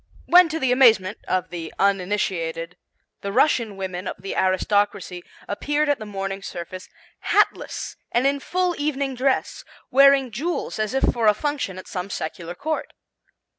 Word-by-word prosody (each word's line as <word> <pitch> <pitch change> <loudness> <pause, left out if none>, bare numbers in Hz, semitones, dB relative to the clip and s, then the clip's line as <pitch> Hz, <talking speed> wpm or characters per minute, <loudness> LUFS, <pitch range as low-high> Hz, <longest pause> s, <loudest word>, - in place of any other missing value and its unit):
when 355 -1 +7
to 320 +1 -2
the 265 -3 +1
amazement 225 -6 +4
of 185 0 -1
the 165 -2 -6
uninitiated 180 -4 0 0.5
the 200 - -3
Russian 230 -4 +2
women 185 -1 -4
of - - -3
the 195 +1 -5
aristocracy 190 -1 0 0.2
appeared 295 +8 0
at 285 - +2
the 215 - -7
morning 195 -1 -4
service 185 0 -7 0.4
hatless - - +1
and 240 +2 +2
in 280 +1 +2
full 360 +4 -1
evening 280 -2 -1
dress, 260 +1 0 0.3
wearing 275 -1 +5
jewels 300 +2 -3
as 215 +3 -1
if 270 - +1
for 230 -2 +2
a 210 - +6
function 280 -8 -2
at 185 - -9
some 180 +1 -5
secular 170 0 -5
court. 310 - -3
210 Hz, 155 wpm, -23 LUFS, 185-275 Hz, 0.5 s, when